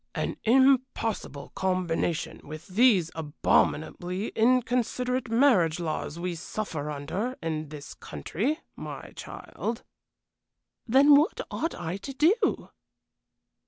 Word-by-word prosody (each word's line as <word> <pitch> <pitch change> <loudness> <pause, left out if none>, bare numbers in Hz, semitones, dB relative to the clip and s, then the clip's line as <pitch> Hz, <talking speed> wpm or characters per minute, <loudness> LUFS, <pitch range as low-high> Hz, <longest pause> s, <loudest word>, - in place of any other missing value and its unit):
"An - - -2
impossible 255 - +2
combination, 170 -3 -1
with 155 +4 -9
these 195 -4 +4
abominably 160 +4 0
inconsiderate 250 +1 +1
marriage 225 - +4
laws 160 -2 -3
we 175 +1 -2
suffer 160 -3 -4
under 185 - -3
in 155 -2 -3
this 145 -1 -9
country, 205 - -3
my - - -8
child." 230 +1 -6 1.0
"Then 275 +5 +6
what 300 +3 +3
ought 330 - -2
I 175 +3 -4
to 270 +7 -7
do?" 320 - +2
195 Hz, 100 wpm, -27 LUFS, 160-255 Hz, 1.0 s, Then